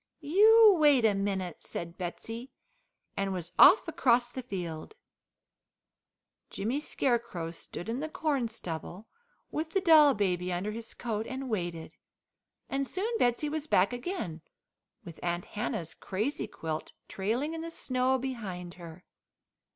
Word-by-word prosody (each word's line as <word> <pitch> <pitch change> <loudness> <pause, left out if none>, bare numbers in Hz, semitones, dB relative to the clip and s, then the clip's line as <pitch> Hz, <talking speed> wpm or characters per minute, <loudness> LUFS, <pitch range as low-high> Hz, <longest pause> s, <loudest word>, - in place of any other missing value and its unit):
"You 425 +6 +7
wait 285 -6 +5
a 215 - +4
minute," 195 -3 -2
said 170 0 -6
Betsey, 225 +8 -6 0.7
and 195 0 -1
was 175 -2 -3
off 375 - +8
across 245 -7 +2
the 260 - -5
field. 180 - -6 1.5
Jimmy 230 +8 -2
Scarecrow 235 - -1
stood 175 +2 -8
in 230 +3 -2
the 310 +2 -3
corn 290 -6 0
stubble, 185 -1 -7 0.5
with 315 +1 -3
the 390 - +3
doll 315 -6 +7
baby 180 -3 0
under 180 +4 -2
his 230 +1 -6
coat 225 -2 -3
and 265 -1 -5
waited, 175 -5 -3 0.8
and 275 0 -2
soon 435 - -2
Betsey 245 +5 +2
was 305 0 -3
back 195 0 +3
again 245 - -4 0.6
with 170 -2 -10
Aunt 175 0 -2
Hannah's 205 -7 -4
crazy 215 +9 -3
quilt 155 -1 -5
trailing 235 +11 -2
in 325 - -4
the 335 - -5
snow 260 -4 0
behind 205 -10 -5
her. 170 +1 -11
230 Hz, 135 wpm, -30 LUFS, 180-285 Hz, 1.5 s, off